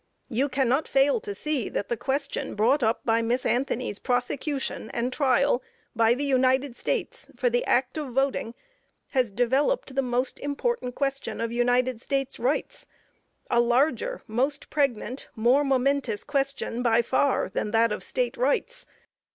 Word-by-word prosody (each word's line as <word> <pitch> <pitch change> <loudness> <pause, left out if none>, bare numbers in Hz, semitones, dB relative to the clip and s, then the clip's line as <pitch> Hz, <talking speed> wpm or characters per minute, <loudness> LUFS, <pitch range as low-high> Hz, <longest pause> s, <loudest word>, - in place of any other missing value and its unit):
You 265 +5 0
cannot 265 +2 +1
fail 275 +8 +3
to 415 -1 -6
see 300 - -2
that 200 - -3
the 235 - -1
question 275 +4 -2
brought 245 +8 +3
up 225 0 +1
by 230 0 +3
Miss 240 +3 0
Anthony's 250 -4 -1
prosecution 255 0 -2
and 245 +2 -2
trial 270 -1 +2 0.3
by 230 +1 +4
the 280 - -3
United 260 -1 +2
States 275 - -3
for 245 0 +1
the 245 +1 +1
act 255 +4 +1
of 295 - -4
voting, 260 -2 -1 0.6
has 255 -6 +1
developed 265 - +1
the 270 - +1
most 250 0 -1
important 285 - -2
question 275 -1 -2
of 230 0 -2
United 245 0 +1
States 270 -1 -2
rights; 260 +6 -2 0.6
a 235 - +4
larger, 280 - +1
most 270 +6 -2
pregnant, 265 -3 -1
more 245 +6 +3
momentous 265 -4 +1
question 275 -3 -2
by 235 -1 +3
far, 265 +3 +1
than 190 - -3
that 225 +1 +3
of 210 - -3
State - - -2
rights. - - 0
255 Hz, 150 wpm, -26 LUFS, 240-280 Hz, 0.6 s, by